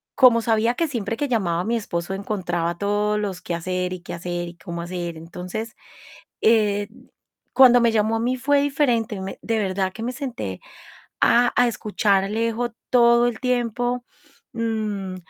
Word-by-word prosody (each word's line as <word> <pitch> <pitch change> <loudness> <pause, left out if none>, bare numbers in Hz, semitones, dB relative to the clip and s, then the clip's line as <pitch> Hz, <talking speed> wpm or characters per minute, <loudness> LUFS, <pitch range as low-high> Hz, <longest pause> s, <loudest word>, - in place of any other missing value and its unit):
como 245 -4 +6
sabía 225 +1 +2
que 330 +5 0
siempre 230 -5 -3
que 290 - -1
llamaba, 180 -9 0
mi 235 +3 0
esposo 190 -4 -3
encontraba 175 -4 -2
todos 210 +1 0
los 195 -3 -4
qué 175 - -4
hacer, 180 +2 -2
y 185 - -6
qué 175 - -7
hacer 175 0 -4
y 170 - -13
cómo 170 -1 -6
hacer. 175 -1 -5
Entonces, 180 +7 -6 0.7
eh, 205 -2 +3 0.7
cuando 250 -2 +7
me 235 -1 +4
llamó 220 0 +1
a - - -2
mí 250 +2 0
fue 280 +2 +2
diferente, 240 -8 0
me 190 0 -6
de 225 -1 0
verdad 190 -1 -1
que - - -9
me 245 +2 -2
senté 230 - -5 0.6
a 245 +1 +4
a 245 0 +5
escuchar 205 -3 +1
a - - -2
Alejo, 230 +2 -1 0.2
todo 235 -1 +5
el 230 -2 -4
tiempo, 245 -1 0 0.5
mm, 215 -5 -2
215 Hz, 170 wpm, -23 LUFS, 185-235 Hz, 0.7 s, cuando